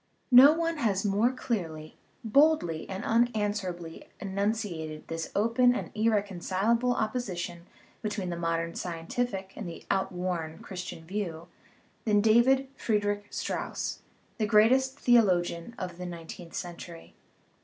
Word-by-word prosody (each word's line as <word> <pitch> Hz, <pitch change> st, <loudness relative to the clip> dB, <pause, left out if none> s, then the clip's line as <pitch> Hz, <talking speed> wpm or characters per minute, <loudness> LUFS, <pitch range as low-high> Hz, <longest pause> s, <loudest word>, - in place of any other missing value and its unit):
No 265 Hz, +4 st, +10 dB
one 330 Hz, 0 st, -1 dB
has 210 Hz, -7 st, 0 dB
more 205 Hz, +5 st, +3 dB
clearly, 165 Hz, -12 st, -4 dB, 0.3 s
boldly, 230 Hz, -, +3 dB
and 190 Hz, 0 st, -4 dB
unanswerably 205 Hz, -7 st, -1 dB
enunciated 195 Hz, -6 st, -3 dB
this 165 Hz, 0 st, -4 dB
open 230 Hz, +4 st, +4 dB
and -, -, -4 dB
irreconcilable 215 Hz, +2 st, +1 dB
opposition 185 Hz, -7 st, -3 dB, 0.3 s
be 215 Hz, -, -1 dB
tween 195 Hz, -4 st, -3 dB
the -, -, -2 dB
modern 165 Hz, 0 st, -1 dB
scientific 190 Hz, +3 st, -3 dB
and 200 Hz, -6 st, -6 dB
the 165 Hz, -, -10 dB
outworn 180 Hz, -4 st, -2 dB
Christian 180 Hz, -3 st, -7 dB
view 175 Hz, -3 st, -4 dB, 0.6 s
than 210 Hz, -2 st, +4 dB
David 240 Hz, +5 st, +4 dB
Friedrich 205 Hz, -4 st, -1 dB
Strauss, -, -, -3 dB, 0.4 s
the 215 Hz, -, +1 dB
greatest 255 Hz, +5 st, +4 dB
theo 240 Hz, -3 st, +6 dB
logian 175 Hz, +1 st, -1 dB
of 180 Hz, -2 st, -6 dB
the 180 Hz, -, -4 dB
nineteenth 170 Hz, 0 st, -9 dB
century. 170 Hz, -1 st, -7 dB
200 Hz, 120 wpm, -29 LUFS, 175-230 Hz, 0.6 s, No